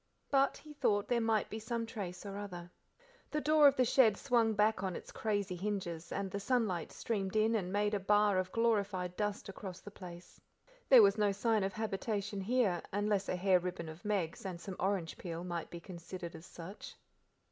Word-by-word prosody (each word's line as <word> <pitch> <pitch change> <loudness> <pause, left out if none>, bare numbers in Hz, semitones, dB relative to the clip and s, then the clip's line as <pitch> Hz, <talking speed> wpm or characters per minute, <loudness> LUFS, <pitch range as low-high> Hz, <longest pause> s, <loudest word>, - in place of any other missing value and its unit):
But 275 0 +3
he 305 -1 -12
thought, 205 -8 +1
there 240 -1 +2
might 225 -2 +1
be 220 - -5
some 230 +1 -2
trace 195 -5 -6
or 200 -1 -5
other. 180 -4 -7 0.6
The 300 - -1
door 305 0 +6
of 280 - +5
the 255 - +3
shed 225 -4 +5
swung 235 -4 +2
back 210 -1 +2
on 190 -2 -2
its - - -8
crazy 205 -4 -1
hinges, 175 -4 -4
and 195 -1 -2
the 200 - -2
sunlight 205 -7 0
streamed 200 -3 -3
in 215 +1 +3
and 190 -5 -1
made 205 +1 +1
a 205 - +1
bar 205 0 +3
of 185 0 -2
glorified 200 -6 0
dust 210 0 -2
across 190 -2 -7
the 205 - -11
place. 175 -3 -11 0.5
There 255 -5 +10
was 200 +1 +4
no 205 -1 +3
sign 215 +1 +1
of 195 0 -1
habitation 205 -1 -2
here, 205 -4 +1
unless 205 0 0
a - - +1
hair 185 0 +4
ribbon 180 -2 -4
of 160 +2 -10
Meg's 195 -6 -1
and 185 -3 -5
some 190 +1 -6
orange 190 -4 -1
peel, 170 -1 -5
might 175 -2 -4
be 170 - -7
considered 175 0 -8
as 160 +3 -11
such. 180 +4 -9
200 Hz, 200 wpm, -34 LUFS, 180-220 Hz, 0.6 s, There